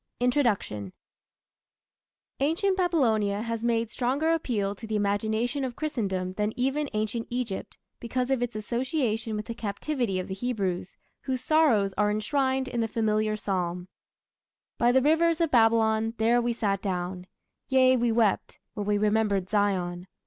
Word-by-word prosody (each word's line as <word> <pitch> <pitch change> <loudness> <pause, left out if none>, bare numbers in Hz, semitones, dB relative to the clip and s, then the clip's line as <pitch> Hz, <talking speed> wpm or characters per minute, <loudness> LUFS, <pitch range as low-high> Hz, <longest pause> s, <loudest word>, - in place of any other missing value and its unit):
INTRODUCTION 230 - 0 1.5
Ancient 330 +8 +1
Babylonia 225 - +1
has 230 -1 -3
made 230 -1 0
stronger 275 +6 0
appeal 215 -11 -1
to 225 +3 -10
the 215 - -2
imagination 220 +6 0
of 250 -2 -3
Christendom 195 -12 -2
than 210 +2 -2
even 270 +3 0
Ancient 215 +2 -2
Egypt, 240 -5 -4 0.2
because 250 +2 -2
of 265 -2 +1
its 240 -2 -2
association 230 0 -1
with 210 0 -4
the 230 - -5
captivity 230 0 -2
of 185 - -4
the 190 - -4
Hebrews, 195 -5 -3 0.2
whose 260 -2 -3
sorrows 255 -11 +3
are 210 0 +3
enshrined 260 +5 0
in 240 -2 -2
the 225 - 0
familiar 215 -1 0
psalm: 180 -3 -3 0.9
By 240 +1 +4
the 260 +1 +3
rivers 325 +2 +3
of 330 -2 +1
Babylon, 225 -1 +3
there 235 +2 +3
we 240 0 0
sat 200 -4 -1
down; 180 -1 -3 0.4
Yea, 260 -1 +5
we 240 -1 +1
wept, 225 -3 +1 0.2
when 205 -1 -4
we 205 0 +2
remembered 205 -3 +1
Zion. 185 -4 0
225 Hz, 150 wpm, -27 LUFS, 205-255 Hz, 1.5 s, Yea